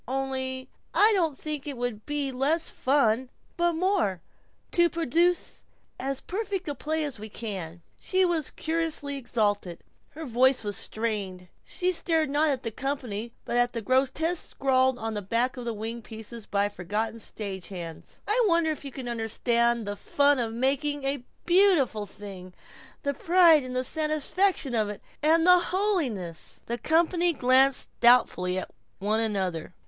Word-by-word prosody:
Only 260 0 -3 0.3
I 430 +2 +7
don't 330 -8 +1
think 300 -2 -4
it 280 -3 -4
would 240 -3 -4
be 290 -2 -1
less 290 +6 +1
fun, 255 -2 +2 0.3
but 345 0 +1
more, 340 - +1 0.5
to 345 0 +4
produce 335 +2 0 0.4
as 270 0 -3
perfect 390 -2 -4
a 290 - -1
play 310 +2 -2
as 280 -7 -6
we 215 +1 -8
can." 185 -7 -6 0.2
She 375 0 +2
was 330 -5 0
curiously 320 -3 -2
exalted; 205 -8 -1 0.3
her 320 +1 -6
voice 255 0 +3
was 205 -1 -3
strained; 200 -5 -3
she 365 0 0
stared 325 -4 +1
not 300 +2 +3
at 270 -3 -1
the 230 - -3
company 240 -4 -4
but 240 - -1
at 245 0 +2
the 230 - -3
grotesques 275 +8 +1
scrawled 260 -1 +2
on 225 -2 -4
the 210 - -3
backs 235 +6 -1
of 235 -2 -4
wing 225 +3 -5
pieces 220 0 -9
by 200 0 +1
forgotten 210 +4 -3
stage 200 -4 -6
hands. 170 -4 -8
"I 455 +4 +3
wonder 335 -3 +2
if 305 - -6
you 275 - -7
can 260 -1 -6
understand 235 0 0
the 205 0 -4
'fun' 285 +5 +2
of 230 -2 -1
making 275 +4 0
a 275 -1 -1 0.2
beautiful 345 - +3
thing, 185 -2 -6 0.5
the 280 -1 0
pride 335 0 +5
and 255 0 -5
satisfaction 310 +1 0
of 215 -3 +1
it, 210 - -6 0.2
and 325 +2 +4
the 360 0 +7
holiness!" 330 - -2
The 235 +1 -4
company 340 - +2
glanced 265 0 +4
doubtfully 220 -7 +4
at 185 - -5 0.3
one 210 +3 0
another. 190 -6 -2
260 Hz, 155 wpm, -27 LUFS, 220-315 Hz, 0.5 s, I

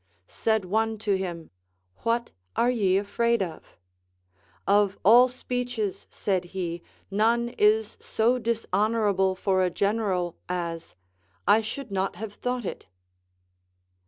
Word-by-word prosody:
Said 220 -3 0
one 220 +3 0
to 205 -2 0
him, 175 -4 -5 0.5
What 235 +1 -1 0.2
are 240 +1 +3
ye 195 -6 +2
afraid 235 +2 +1
of? 165 -4 -9 0.9
Of 200 -1 +3
all 240 +5 +8
speeches, 245 -5 -3
said 190 -3 -1
he, 170 -2 -3 0.3
none 230 +4 +2
is 425 - +2
so 240 +3 +1
dishonorable 210 -3 +1
for 190 0 +1
a 185 - +2
general, 195 -3 0
as 170 - -4 0.5
I 205 +3 +6
should 225 +2 -6
not 190 -1 -1
have 205 +2 -6
thought 250 0 -3
it. - - -6
210 Hz, 120 wpm, -26 LUFS, 190-235 Hz, 0.9 s, all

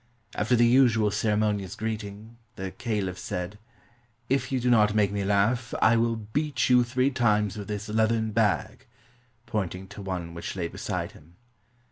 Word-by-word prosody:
After 115 +4 +1
the 120 0 +5
usual 115 -4 +4
ceremonious 105 -2 0
greeting, 110 +1 -5 0.2
the 95 0 -5
caliph 100 -6 -3
said, 90 +3 -5 0.7
"If 130 -1 0
you 130 - +1
do 125 0 +1
not 105 -2 +4
make 105 -2 +3
me 100 0 -2
laugh, 105 +5 +1
I 110 +2 +5
will 115 0 +2
beat 130 +7 -1
you 125 -1 +6
three 130 +3 +1
times 105 -6 +1
with 105 -2 -6
this 105 +1 -4
leathern 110 +1 +1
bag," 110 +3 0 0.6
pointing 95 -3 -3
to 105 0 -9
one 90 -3 -4
which 85 - -6
lay 90 -3 -2
beside - - -4
him. 80 +3 -19
105 Hz, 160 wpm, -27 LUFS, 100-115 Hz, 0.7 s, you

